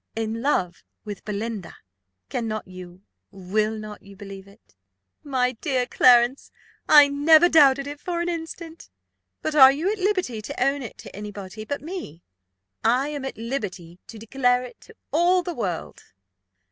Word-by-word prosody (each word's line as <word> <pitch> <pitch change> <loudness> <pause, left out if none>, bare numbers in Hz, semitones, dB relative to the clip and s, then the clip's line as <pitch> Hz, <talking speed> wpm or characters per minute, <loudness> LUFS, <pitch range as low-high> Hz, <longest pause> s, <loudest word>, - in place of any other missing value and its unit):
"In 225 0 -3
love 190 -11 -1 0.2
with 205 -2 -7
Belinda! 210 -2 -5 0.5
Cannot 215 - -4
you, 185 0 -12 0.3
will 210 +3 -2
not 215 -1 -9
you 200 0 -15
believe 195 -1 -10
it?" 200 - -22 0.5
"My 255 -3 0
dear 255 0 -1
Clarence, 245 +1 +4 0.4
I 295 -1 +9
never 310 +4 +5
doubted 280 -5 +5
it 290 0 -7
for 345 +1 -3
an 345 - -2
instant. 330 -1 -7 0.5
But 310 - -2
are 265 -3 +9
you 320 +8 -1
at 430 - -4
liberty 370 - -1
to 215 - -7
own 275 +1 0
it 240 - -8
to - - -12
any 210 +1 -6
body 205 +2 -9
but 285 +4 -4
me?" 310 - -8 0.6
"I 255 +5 +2
am 290 -2 -5
at 270 - -6
liberty 200 -8 -5
to 225 - -11
declare 245 +2 +1
it 250 - -12
to 455 - -17 0.2
all 355 +3 +3
the 350 - -4
world." 185 - -4
245 Hz, 160 wpm, -24 LUFS, 210-295 Hz, 0.6 s, I